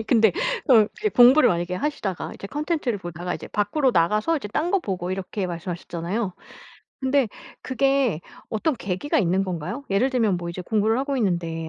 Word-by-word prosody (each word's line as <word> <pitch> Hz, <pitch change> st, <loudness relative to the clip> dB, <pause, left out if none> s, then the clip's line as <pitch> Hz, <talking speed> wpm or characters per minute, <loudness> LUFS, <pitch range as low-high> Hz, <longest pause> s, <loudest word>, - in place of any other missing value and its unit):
아니 220 Hz, -, -6 dB
근데 225 Hz, -2 st, +5 dB, 0.4 s
어 225 Hz, -5 st, +7 dB
이게 425 Hz, -, +1 dB
공부를 260 Hz, -2 st, +7 dB
만약에 175 Hz, +1 st, -1 dB
하시다가 205 Hz, -, -3 dB
이제 -, -, -8 dB
컨텐츠를 295 Hz, -, -2 dB
보다가 175 Hz, -1 st, -5 dB
이제 -, -, -8 dB
밖으로 255 Hz, +7 st, +1 dB
나가서 210 Hz, -, +2 dB
이제 275 Hz, -, -5 dB
딴 310 Hz, -, -1 dB
거 395 Hz, -, +4 dB
보고 185 Hz, -, -4 dB
이렇게 190 Hz, +1 st, -3 dB
말씀하셨잖아요. 175 Hz, +3 st, -4 dB, 0.7 s
근데 265 Hz, -2 st, +2 dB, 0.3 s
그게 270 Hz, -, +1 dB, 0.3 s
어떤 245 Hz, +8 st, 0 dB
계기가 195 Hz, +8 st, -1 dB
있는 190 Hz, 0 st, +2 dB
건가요? 185 Hz, -, -4 dB
예를 215 Hz, +7 st, +2 dB
들면 225 Hz, -7 st, +2 dB
뭐 175 Hz, 0 st, -5 dB
이제 170 Hz, -, -6 dB
공부를 220 Hz, +4 st, +1 dB
하고 275 Hz, +1 st, -1 dB
있는데 170 Hz, -7 st, -1 dB
210 Hz, 405 characters per minute, -24 LUFS, 180-265 Hz, 0.7 s, 어